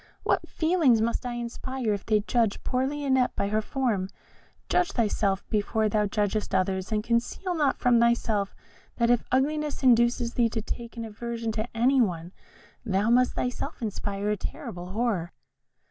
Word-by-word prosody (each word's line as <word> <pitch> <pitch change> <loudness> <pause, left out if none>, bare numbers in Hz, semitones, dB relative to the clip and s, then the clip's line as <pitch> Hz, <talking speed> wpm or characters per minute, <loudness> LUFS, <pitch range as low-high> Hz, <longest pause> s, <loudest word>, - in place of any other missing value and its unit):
What - - 0
feelings 315 -8 +3
must 235 +2 -1
I 245 - -3
inspire 240 0 -3
if 200 - -5
they 215 -1 +3
judge 225 -1 0
poor 255 +1 0
Lionette 270 -3 +1
by 200 - -1
her 215 +1 +1
form? 215 -6 -1 0.6
Judge 360 -1 +1
thyself 205 -4 0
before 215 +1 +1
thou 210 0 +1
judgest 205 0 -1
others, 190 +1 0
and 210 -1 0
conceal 235 - -1
not 295 -5 +1
from 245 -1 +4
thyself 230 -4 +1 0.4
that 235 0 +2
if 245 - +3
ugliness 295 +3 0
induces 240 -1 +3
thee 235 -2 +2
to 225 0 -3
take 235 +1 -6
an 230 - -4
aversion 230 +1 -4
to 220 +2 -4
any 260 +3 +4
one, 175 -5 -1 0.5
thou 210 0 +1
must 250 +1 +4
thyself 255 +4 -3
inspire 205 -2 -2
a 210 - 0
terrible 175 -1 -6
horror." 205 -7 -1
230 Hz, 160 wpm, -27 LUFS, 210-250 Hz, 0.6 s, from